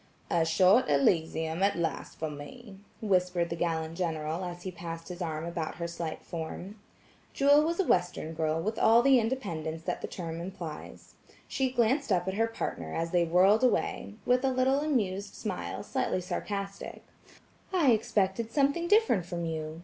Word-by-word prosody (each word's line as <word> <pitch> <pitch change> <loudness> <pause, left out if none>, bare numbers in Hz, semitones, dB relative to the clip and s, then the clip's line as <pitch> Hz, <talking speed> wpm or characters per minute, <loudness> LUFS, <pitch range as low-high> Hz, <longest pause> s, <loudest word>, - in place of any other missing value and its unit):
"A 165 -1 +3
short 185 +8 +4
Elysium 160 +3 +1
at 200 +1 +3
last 165 -1 -3
for 160 -1 -3
me," 195 - -10 0.3
whispered 180 -4 +1
the - - -1
gallant 165 -1 -2
General 160 0 -2
as 175 -1 -6
he 185 - -4
passed 165 -1 -7
his 180 0 -7
arm 160 -2 -3
about 170 -2 -4
her 170 -1 -4
slight 170 -2 -5
form. 175 +5 -6 0.5
Jewel 285 +2 +5
was 335 +3 -1
a - - +4
Western 175 - 0
girl 160 0 0
with 215 +6 -2
all 230 +2 +6
the 270 -1 +6
independence 165 -10 -3
that - - -3
the - - -4
term 165 -2 -5
implies. 170 -4 -8 0.3
She 265 -1 0
glanced 250 +1 +1
up 180 -1 +2
at 190 - -1
her 225 +3 +1
partner, 225 - -4
as 165 0 -2
they 175 -1 +3
whirled 190 +7 +4
away, 235 -4 0
with 250 +1 +3
a 270 - +3
little 260 +2 +2
amused 210 -10 -1
smile - - -4
slightly - - -1
sarcastic; 195 +2 -5 0.7
"I 335 -9 +4
expected 220 0 +1
something 285 +6 +1
different 410 - +3
from 170 -1 -3
you. 160 0 -4
180 Hz, 170 wpm, -29 LUFS, 165-230 Hz, 0.7 s, all